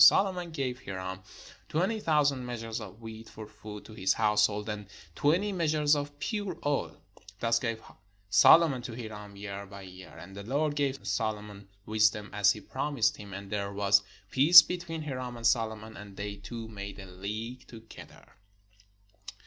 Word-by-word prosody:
And -, -, +12 dB
Solomon 180 Hz, -3 st, +2 dB
gave 135 Hz, -5 st, -3 dB
Hiram 95 Hz, -1 st, -5 dB, 0.5 s
twenty 190 Hz, +8 st, 0 dB
thousand 145 Hz, -7 st, +2 dB
measures 115 Hz, -2 st, -5 dB
of 105 Hz, +1 st, -10 dB
wheat 110 Hz, 0 st, -9 dB
for 110 Hz, -, -9 dB
food 105 Hz, -1 st, -10 dB
to 110 Hz, -, -11 dB
his 95 Hz, -3 st, +2 dB
household, 105 Hz, -1 st, +2 dB
and 105 Hz, -2 st, -5 dB, 0.3 s
twenty 175 Hz, -, +2 dB
measures 155 Hz, -4 st, +2 dB
of 145 Hz, 0 st, -4 dB
pure 205 Hz, +3 st, -3 dB
oil: 145 Hz, -1 st, -1 dB, 0.4 s
thus 115 Hz, 0 st, +2 dB
gave 115 Hz, -3 st, -2 dB, 0.5 s
Solomon 130 Hz, +8 st, +6 dB
to 120 Hz, -1 st, -6 dB
Hiram 105 Hz, -3 st, -8 dB
year 100 Hz, 0 st, -6 dB
by 100 Hz, 0 st, -10 dB
year. 95 Hz, -1 st, -12 dB
And 95 Hz, +2 st, -11 dB
the 100 Hz, -, -6 dB
Lord 145 Hz, +7 st, 0 dB
gave 140 Hz, -5 st, -1 dB
Solomon 105 Hz, 0 st, -3 dB, 0.2 s
wisdom, 105 Hz, -1 st, +2 dB
as 105 Hz, 0 st, +4 dB
he 105 Hz, -, -10 dB
promised 135 Hz, -3 st, 0 dB
him: 100 Hz, -2 st, -10 dB
and 100 Hz, +1 st, -8 dB
there 100 Hz, -1 st, -2 dB
was 100 Hz, 0 st, +4 dB, 0.3 s
peace 165 Hz, +6 st, +10 dB
between 170 Hz, -3 st, -5 dB
Hiram 130 Hz, -4 st, -5 dB
and 115 Hz, -, -7 dB
Solomon; 110 Hz, -2 st, +1 dB
and 100 Hz, -1 st, -11 dB
they 100 Hz, 0 st, -4 dB
two 115 Hz, 0 st, -7 dB
made 100 Hz, -2 st, -7 dB
a 95 Hz, -, -9 dB
league 105 Hz, +7 st, -6 dB
together. 115 Hz, -1 st, -14 dB
110 Hz, 165 wpm, -30 LUFS, 100-140 Hz, 0.5 s, And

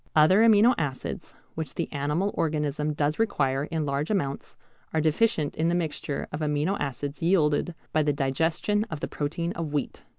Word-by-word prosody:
Other 160 Hz, +7 st, +6 dB
amino 225 Hz, +2 st, +6 dB
acids 140 Hz, -4 st, -4 dB, 0.2 s
which 155 Hz, -4 st, -5 dB
the -, -, -2 dB
animal 150 Hz, +7 st, 0 dB
organism 150 Hz, -1 st, -1 dB
does 150 Hz, +3 st, 0 dB
require 140 Hz, -10 st, +1 dB
in 160 Hz, -1 st, -2 dB
large 140 Hz, +2 st, -1 dB
amounts 140 Hz, -10 st, -2 dB, 0.4 s
are -, -, +3 dB
deficient 155 Hz, 0 st, +1 dB
in 160 Hz, -, +1 dB
the 175 Hz, -, +1 dB
mixture 155 Hz, -4 st, -3 dB
of 150 Hz, -, -4 dB
amino 150 Hz, +4 st, 0 dB
acids 140 Hz, +1 st, -4 dB
yielded 165 Hz, -1 st, +2 dB, 0.2 s
by 155 Hz, -, +3 dB
the 150 Hz, -1 st, +2 dB
digestion 160 Hz, +9 st, 0 dB
of 155 Hz, -, -5 dB
the -, -, -2 dB
protein 165 Hz, +4 st, -3 dB
of 165 Hz, -4 st, -4 dB
wheat. 145 Hz, -, -2 dB
155 Hz, 170 wpm, -27 LUFS, 145-170 Hz, 0.4 s, Other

